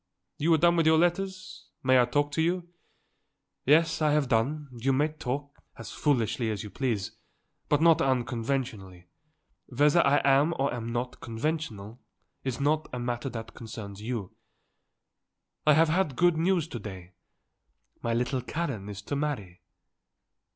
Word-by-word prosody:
You 160 +3 +2
are - - +3
done 170 +2 +4
with 165 -1 +3
your 160 0 +6
letters? 185 - -1 0.2
I - - -7
may 130 -1 +6
talk 145 +3 0
to 160 - 0
you?" 175 +1 0 1.0
"Yes, 165 +3 +4
I 150 -1 +3
have 150 -4 +1
done. 140 +7 0
You 130 +3 0
may 145 +4 +2
talk, 145 -1 -5 0.2
as - - -8
foolishly 120 -5 0
as 105 -3 -3
you 105 - -8
please, 110 -6 -2 0.6
but 150 +1 +3
not 165 -2 +6
unconventionally; 120 -7 -2 0.6
whether 145 +6 +4
I 140 +1 +4
am 140 +4 +4
or 135 0 0
am 115 -1 -4
not 120 +1 -4
conventional 115 -3 -4 0.4
is 130 -1 -3
not 150 +2 +1
a 125 - -4
matter 120 +2 -3
that 115 -1 -7
concerns 105 -3 -8
you. 110 -4 -4 1.4
I 150 - +8
have 160 +2 +4
had 165 -5 +1
good 175 +2 +4
news 170 0 +1
to 120 - -5
day. 95 -4 -9 0.9
My 115 0 -1
little 125 +2 0
Karen 125 -8 -4
is 100 -1 -7
to 145 - -3
marry." 130 -12 -3
135 Hz, 155 wpm, -28 LUFS, 115-155 Hz, 1.4 s, I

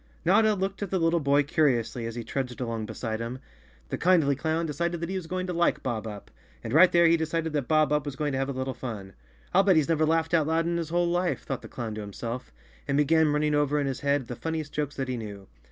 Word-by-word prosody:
Notta 220 -1 +4
looked 195 +1 -3
at 200 - -2
the 190 - 0
little 165 0 +2
boy 145 -1 +3
curiously 125 -6 +1
as 115 - -6
he 120 - -4
trudged 125 0 -4
along 115 -3 -3
beside 110 -1 -4
him. 115 +2 -4 0.5
The - - -3
kindly 165 -6 +4
clown 160 +3 -1
decided 170 +2 -2
that 170 +1 -4
he - - -2
was 185 -3 -4
going 185 +1 -2
to 180 - -3
like 170 0 +1
Bob 115 -4 -2
Up, 105 -2 -9 0.3
and 115 - -4
right 180 +4 +7
there 170 0 +5
he 165 0 +6
decided 160 0 -2
that 145 -5 -1
Bob 155 -2 +3
Up 150 -1 +2
was 140 - -4
going 145 +1 -1
to 135 - -1
have 135 +1 -1
a - - 0
little 130 0 -3
fun. 105 -8 -7 0.4
"I'll 190 - +6
bet 195 -2 +4
he's 155 -1 +2
never 155 -1 +2
laughed 160 +1 +1
out 160 -3 +3
loud 165 +1 +1
in 170 0 0
his 165 -2 -3
whole 175 +1 +2
life," 175 +1 0
thought 135 -3 -4
the - - -10
clown 115 -3 -5
to 110 - -5
himself, 115 - -6 0.4
and 140 0 +1
began 155 +1 +4
running 150 0 +1
over 145 0 +2
in 145 - 0
his 135 -1 -2
head 140 -2 +1
the 120 - -5
funniest 160 +1 -4
jokes 150 -1 -2
that 135 -1 -3
he 130 -1 -2
knew. 100 -3 -8
150 Hz, 265 wpm, -27 LUFS, 125-165 Hz, 0.5 s, right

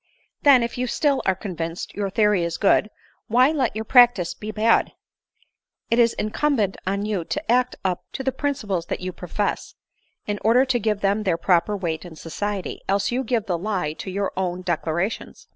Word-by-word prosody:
" - - -46
Then, 270 -4 +7
if 235 +1 -4
you 250 - 0
still 280 +2 +1
are 190 - +3
convinced 170 -3 -5
your 200 -1 -2
theory 210 -2 +2
is 170 -1 -2
good, 210 +1 +3 0.4
why 250 +5 +4
let 270 -9 0
your 220 0 -3
practice 240 -8 +5
be 215 - -8
bad? 215 +2 +2 1.0
It 230 - +3
is 230 -1 +4
incumbent 215 -2 0
on 200 +2 -1
you 205 -5 -1
to 295 - -3
act 250 +1 +2
up 180 -2 0
to 265 - -4
the 265 - +1
principles 215 -11 -2
that - - -3
you 185 0 -3
profess, 180 +4 -3 0.5
in 205 -1 -3
order 240 +4 +5
to 255 -2 +1
give 210 -2 -1
them 200 +2 +1
their 185 -5 0
proper 180 +4 +2
weight 165 -4 -3
in 175 -3 -10
society, 195 +5 -4
else 195 +2 +1
you 255 +2 0
give 230 -3 -1
the 175 -5 -1
lie 185 -6 -2
to 190 - -7
your 195 +1 -2
own 185 -1 -2
declarations." 175 +3 -2
205 Hz, 195 wpm, -23 LUFS, 185-235 Hz, 1.0 s, Then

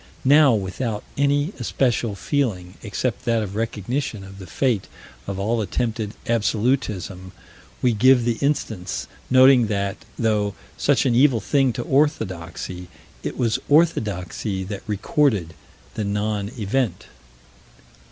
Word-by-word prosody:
Now, 140 -2 +6
without 105 +2 -3
any 145 +5 +1
especial 120 -3 0
feeling, 100 -9 -1
except 115 +3 -3
that 115 -2 +2
of 100 -1 -6
recognition 115 +1 -3
of 95 0 -11
the 95 - -9
fate 120 - 0 0.4
of 100 -1 -3
all 110 +4 0
attempted 110 0 -2
absolutism, 105 -5 -1 0.5
we 125 -2 +4
give 125 +2 +5
the 120 -2 0
instance, 95 - -1 0.2
noting 130 -2 +6
that, 100 -1 -1 0.2
though 105 -3 +1 0.2
such - - +2
an 125 - +3
evil 125 -1 +4
thing 135 +4 +2
to 120 - -3
orthodoxy, 95 - -1 0.3
it - - -5
was 115 -3 +1
orthodoxy 105 - +1
that 100 +1 -6
recorded 105 - +1 0.4
the 110 - -3
non 105 0 -1
event. 110 -2 -1
110 Hz, 125 wpm, -22 LUFS, 100-130 Hz, 0.5 s, Now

